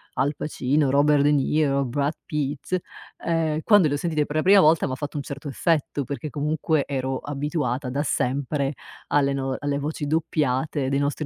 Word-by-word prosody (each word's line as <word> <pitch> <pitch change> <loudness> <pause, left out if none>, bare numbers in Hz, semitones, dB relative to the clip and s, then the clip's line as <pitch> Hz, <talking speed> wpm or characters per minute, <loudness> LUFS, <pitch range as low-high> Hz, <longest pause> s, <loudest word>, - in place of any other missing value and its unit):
Al 145 +2 0
Pacino, 140 -1 0
Robert 145 +1 +4
De 145 - +4
Niro, 140 -1 +2
Brad 140 +4 -1
Pitt, 150 +4 -2 0.5
ehm, 160 -2 0
quando 205 -6 +5
le 145 - 0
ho - - -1
sentite 155 -1 0
per 150 - -6
la - - +3
prima 195 +2 +7
volta 160 0 +4
m'ha 130 - -3
fatto 145 +2 -5
un 140 - -3
certo 140 +1 -7
effetto, 145 -1 0
perché 140 +3 -5
comunque 150 0 0
ero 130 -1 -2
abituata 145 -2 -2
da 140 +4 -1
sempre 140 +1 -1 0.3
alle 140 -1 +2
no, 135 -1 -2
alle 145 -1 -1
voci 150 +1 -3
doppiate 150 -3 0
dei 140 +1 +1
nostri 145 +2 -1
145 Hz, 180 wpm, -24 LUFS, 140-155 Hz, 0.5 s, prima